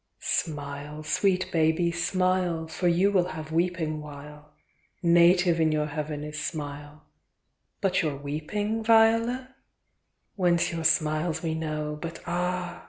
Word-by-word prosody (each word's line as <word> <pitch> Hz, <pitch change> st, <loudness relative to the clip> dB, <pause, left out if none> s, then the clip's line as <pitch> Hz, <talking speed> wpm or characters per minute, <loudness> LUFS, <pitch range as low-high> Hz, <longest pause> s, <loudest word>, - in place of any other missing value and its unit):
X. -, -, 0 dB
Smile, 145 Hz, -1 st, -7 dB
sweet 185 Hz, +3 st, +1 dB
baby, 165 Hz, +1 st, +2 dB
smile, 180 Hz, -1 st, 0 dB
For 160 Hz, +3 st, -2 dB
you 180 Hz, +4 st, +3 dB
will 180 Hz, -3 st, +2 dB
have 155 Hz, 0 st, -7 dB
weeping 165 Hz, -2 st, -1 dB
while; 150 Hz, 0 st, -11 dB, 0.5 s
Native 175 Hz, 0 st, +5 dB
in 160 Hz, -1 st, +3 dB
your 150 Hz, -1 st, +1 dB
Heaven 150 Hz, 0 st, -4 dB
is 150 Hz, 0 st, -5 dB
smile,— 145 Hz, -1 st, -6 dB, 0.8 s
But 190 Hz, -2 st, +2 dB
your 155 Hz, -4 st, -1 dB
weeping, 160 Hz, +11 st, -3 dB
Viola? 230 Hz, +3 st, +3 dB, 0.8 s
Whence 175 Hz, -3 st, +2 dB
your 165 Hz, -1 st, -4 dB
smiles 155 Hz, +1 st, +1 dB
we 160 Hz, -1 st, -1 dB
know, 150 Hz, -1 st, -3 dB
but 165 Hz, -1 st, -6 dB
ah? 180 Hz, 0 st, -2 dB
165 Hz, 130 wpm, -27 LUFS, 150-180 Hz, 0.8 s, Native